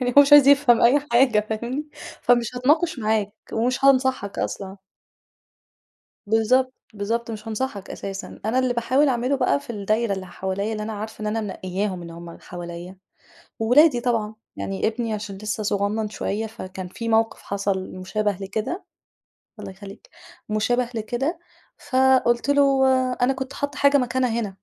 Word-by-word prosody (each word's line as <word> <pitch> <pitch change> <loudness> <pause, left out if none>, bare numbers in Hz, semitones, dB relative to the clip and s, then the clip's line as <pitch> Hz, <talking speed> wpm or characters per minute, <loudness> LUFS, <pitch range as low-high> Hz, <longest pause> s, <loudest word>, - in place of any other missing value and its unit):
يعني 250 -1 -1
هو - - +11
مش 285 +1 0
عايز 290 -2 +9
يفهَم 280 -4 +5
أي 255 +5 +5
حاجة، 235 -4 +4
فاهمني؟ 245 +7 -3 0.3
فمش 240 -1 +2
هاتناقش 300 +5 +2
معاك 215 -2 0 0.2
ومش 245 +4 0
هانصحَك 260 -6 +2
أصلًا. 195 0 -4 1.5
بالضبط، 250 +5 +2 0.2
بالضبط، 230 +3 -2
مش 215 0 -7
هانصَحك 215 -2 -4
أساسًا. 195 0 -7
أنا 225 +4 +1
اللي 255 -1 +1
باحاول 260 +5 +2
أعمله 255 +2 +1
بقى 140 - +1
في - - -11
الدايرة 215 +1 0
اللي 190 -1 -4
حواليّا 190 +4 -3
اللي 215 -1 -4
أنا 220 +1 -4
عارفة 215 +1 -7
إن - - -3
أنا 220 +1 -1
منقيّاهم، 190 -2 -3
إن 170 - -9
هُم 170 0 -10
حواليا 175 +1 -8 0.6
وولادي 245 +3 +5
طبعًا، 225 -3 -1 0.2
يعني 195 +2 -2
ابني 225 0 -2
عشان 205 -2 -5
لسه 215 +1 -3
صغنّن 205 +1 -1
شوية 210 +1 -3
فكان 185 -4 -8
في 230 +5 -5
موقِف 225 0 +1
حصَل 200 -1 -2
مشابه 200 +2 -2
لكده 220 - -4 0.7
الله 200 -2 -7
يخلّيك، 195 - -12 0.4
مشابِه 235 +3 +1
لكده 245 +9 -2 0.5
فقُلت 260 -1 +3
له 280 -1 +4 0.4
أنا 250 +2 +3
كنت 265 0 -6
حاطّة 285 0 -4
حاجة 280 0 +5
مكانها 255 -1 0
هنا. 215 -3 -2
225 Hz, 155 wpm, -23 LUFS, 200-255 Hz, 1.5 s, هو